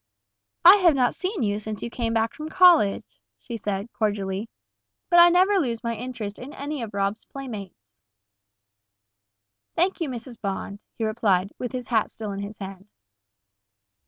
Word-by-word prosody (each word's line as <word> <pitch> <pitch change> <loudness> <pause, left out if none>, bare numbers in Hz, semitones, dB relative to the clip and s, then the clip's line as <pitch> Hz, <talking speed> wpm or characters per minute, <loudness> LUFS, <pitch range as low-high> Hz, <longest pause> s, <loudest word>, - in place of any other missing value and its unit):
"I 375 +4 +11
have 350 -6 +4
not 250 -2 +2
seen 370 - -3
you 205 -1 0
since 215 -1 -6
you 235 - -5
came 235 -2 -2
back 225 0 0
from 310 +1 -7
college," 340 - +5 0.3
she 235 - -8
said, 205 0 -4
cordially; 205 0 -2 0.6
"but 345 - +7
I 345 0 +9
never 375 +3 +4
lose 235 -7 -2
my 230 -1 -2
interest 230 -4 -6
in 270 +4 -9
any 290 -1 -5
of 220 -3 -6
Rob's 200 +2 -1
playmates." 210 - -8 1.9
"Thank 360 +2 +1
you, 320 - -1
Mrs. 240 -1 -8
Bond," 200 0 -4 0.2
he 225 - -4
replied, 205 -4 +1
with 245 - -4
his 250 -1 -5
hat 225 -3 +2
still 215 -2 -6
in 195 - -5
his 200 +1 -6
hand. 195 0 -9
230 Hz, 160 wpm, -25 LUFS, 205-275 Hz, 1.9 s, I